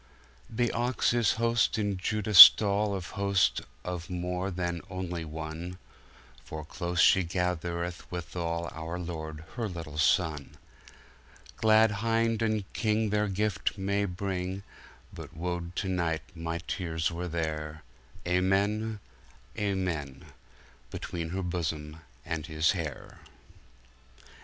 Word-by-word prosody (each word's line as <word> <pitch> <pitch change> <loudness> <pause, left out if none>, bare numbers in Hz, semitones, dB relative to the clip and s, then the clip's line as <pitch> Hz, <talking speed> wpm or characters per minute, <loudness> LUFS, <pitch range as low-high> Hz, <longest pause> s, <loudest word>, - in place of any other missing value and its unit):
The 120 +1 0
Ox 120 +1 +1
is 120 -3 +3
host 115 -2 +1
in 105 -2 0
Judah 105 +3 -2
stallAnd 100 0 +9
Host 100 -1 +1 0.2
of 90 -1 -5
more 90 +1 -2
than 90 -2 -3
onelie 90 -3 -4
one, 80 +3 -6 0.7
For 80 -1 -7
close 85 +2 -4
she 95 - +6
gathereth 85 0 -3
withalOur 85 -1 -4
Lorde 80 -2 -6
her 115 -3 -2
littel 80 -4 -7
Sonne.Glad 95 +7 0
Hinde 115 0 +1
and 110 -3 -1
KingTheir 105 -2 0
Gyfte 100 -1 -1
may 100 +1 0
bring, 95 0 -4 0.5
But - - -10
wo'd 90 +1 -4
to 100 - -2
night 85 -4 -1
my 85 0 -3
Teares 80 -3 -2
were 85 +2 -4
there, 80 -2 -4 0.4
Amen, 100 +4 +1 0.6
Amen:Between 85 -2 -5
her 95 +2 -3
Bosom 80 -3 -3 0.3
and 80 -1 -4
His 80 0 +2
hayre! 85 -6 -6
90 Hz, 105 wpm, -29 LUFS, 85-100 Hz, 0.7 s, stallAnd